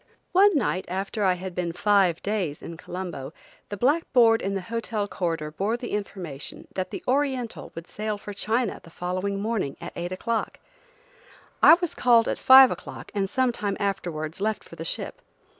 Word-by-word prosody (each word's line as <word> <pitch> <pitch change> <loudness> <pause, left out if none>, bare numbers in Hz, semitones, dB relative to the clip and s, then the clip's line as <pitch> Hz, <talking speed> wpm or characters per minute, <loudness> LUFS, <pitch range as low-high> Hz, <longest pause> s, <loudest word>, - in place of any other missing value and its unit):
ONE 390 -1 +5
night, 200 -7 0
after 195 +3 -3
I 185 -2 +4
had 185 0 -6
been 175 -1 -2
five 195 -3 +2
days 195 -8 -2
in 170 - -7
Colombo, 170 -5 -6 0.4
the 205 - -5
blackboard 245 -4 +4
in 195 +1 -2
the 195 - -2
hotel 225 0 -3
corridor 165 -6 -2
bore 205 +8 -1
the 240 - -6
information 180 -8 -5
that 185 -1 -3
the - - -7
Oriental 260 -3 -1
would 165 +1 -8
sail 215 0 -3
for 205 0 -8
China 220 +3 -1
the 165 - -14
following 185 +4 -3
morning, 210 -9 -2
at - - -8
eight 175 +1 -4
o'clock. 225 +4 -2 1.0
I 320 - +10
was 350 -2 -3
called 235 -2 +4
at - - -1
five 260 0 +9
o'clock - - -8
and 195 -2 -1
some 255 +3 +2
time 205 -4 -3
afterwards 175 -4 -3
left 215 +1 -1
for - - -13
the - - -6
ship. - - -4
200 Hz, 175 wpm, -25 LUFS, 180-230 Hz, 1.0 s, I